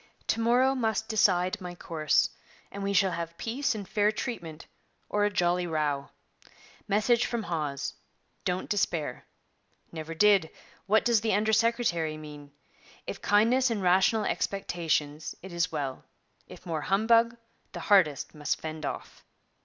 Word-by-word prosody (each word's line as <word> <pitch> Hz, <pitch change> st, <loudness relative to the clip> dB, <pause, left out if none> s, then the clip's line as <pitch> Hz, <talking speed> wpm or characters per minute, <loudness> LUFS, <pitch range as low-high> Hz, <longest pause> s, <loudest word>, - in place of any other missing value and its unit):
To 230 Hz, -, +1 dB
morrow 245 Hz, +3 st, +3 dB
must 220 Hz, -4 st, -1 dB
decide 190 Hz, -2 st, +2 dB
my 180 Hz, -1 st, -6 dB
course, 155 Hz, -3 st, +1 dB, 0.4 s
and 200 Hz, -, -7 dB
we 200 Hz, 0 st, -1 dB
shall 195 Hz, -1 st, +3 dB
have 170 Hz, 0 st, -5 dB
peace 245 Hz, +2 st, -1 dB
and 205 Hz, -3 st, -6 dB
fair 210 Hz, +1 st, +2 dB
treatment, 170 Hz, -9 st, -6 dB, 0.4 s
or 205 Hz, 0 st, +2 dB
a -, -, +2 dB
jolly 180 Hz, -2 st, +1 dB
row. 150 Hz, -4 st, -1 dB, 0.8 s
Message 215 Hz, +4 st, +2 dB
from 235 Hz, -2 st, -2 dB
Hawes: 150 Hz, -6 st, -3 dB, 0.5 s
"Don't 180 Hz, +1 st, -2 dB
despair." 165 Hz, -10 st, -1 dB, 0.7 s
Never 165 Hz, 0 st, -6 dB
did: 200 Hz, -3 st, +4 dB, 0.4 s
What 220 Hz, +2 st, +3 dB
does 235 Hz, -3 st, +3 dB
the 220 Hz, -3 st, +1 dB
under 215 Hz, +1 st, +1 dB
secretary 220 Hz, -9 st, +1 dB
mean? 150 Hz, -2 st, -10 dB, 0.5 s
If -, -, -6 dB
kindness 235 Hz, +6 st, +3 dB
and 215 Hz, -4 st, -2 dB
rational 190 Hz, +4 st, +3 dB
expectations, 160 Hz, -6 st, -1 dB
it 190 Hz, -2 st, -9 dB
is 170 Hz, +1 st, 0 dB
well; 140 Hz, -4 st, -4 dB, 0.4 s
if -, -, -13 dB
more 160 Hz, -3 st, -2 dB
humbug, 230 Hz, +6 st, +3 dB, 0.4 s
the -, -, -6 dB
hardest 180 Hz, -9 st, +3 dB
must 150 Hz, -2 st, -2 dB
fend 155 Hz, -1 st, -5 dB
off.' -, -, -7 dB
190 Hz, 145 wpm, -28 LUFS, 160-220 Hz, 0.8 s, did